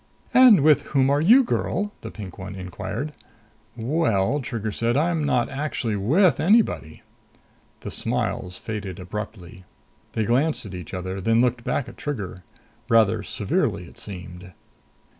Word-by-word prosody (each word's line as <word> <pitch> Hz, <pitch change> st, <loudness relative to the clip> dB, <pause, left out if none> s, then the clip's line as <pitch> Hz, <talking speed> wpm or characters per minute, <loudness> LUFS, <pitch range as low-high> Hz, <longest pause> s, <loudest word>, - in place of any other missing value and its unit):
"And 250 Hz, -, +8 dB
with 150 Hz, -1 st, +5 dB, 0.2 s
whom 135 Hz, 0 st, +4 dB
are 145 Hz, +1 st, +2 dB
you, 235 Hz, +11 st, +7 dB
girl?" 205 Hz, -3 st, -1 dB
the -, -, -6 dB
pink 100 Hz, -4 st, -9 dB
one 95 Hz, +1 st, -7 dB
inquired. 105 Hz, -, -5 dB, 0.6 s
"Well," 120 Hz, -, +1 dB
Trigger 115 Hz, -4 st, -4 dB
said, 115 Hz, +4 st, 0 dB
"I'm 160 Hz, +1 st, +1 dB
not 125 Hz, -4 st, +2 dB
actually 135 Hz, -6 st, -2 dB
with 145 Hz, -, +3 dB
anybody." 195 Hz, -, +2 dB, 0.8 s
The -, -, -6 dB
smiles 90 Hz, 0 st, -2 dB
faded 105 Hz, -4 st, -6 dB
abruptly. 95 Hz, 0 st, -7 dB, 0.5 s
They 110 Hz, -, 0 dB
glanced 135 Hz, +5 st, +1 dB
at 95 Hz, -, -8 dB
each 90 Hz, +1 st, -7 dB
other, 95 Hz, +1 st, -4 dB
then 115 Hz, +4 st, +3 dB
looked 125 Hz, -1 st, +1 dB
back 135 Hz, -, -1 dB
at -, -, -11 dB
Trigger. 100 Hz, -10 st, -5 dB, 0.5 s
Rather 110 Hz, -4 st, +4 dB
severely, -, -, -1 dB
it -, -, -16 dB
seemed. 90 Hz, -1 st, -8 dB
115 Hz, 140 wpm, -24 LUFS, 95-145 Hz, 0.8 s, And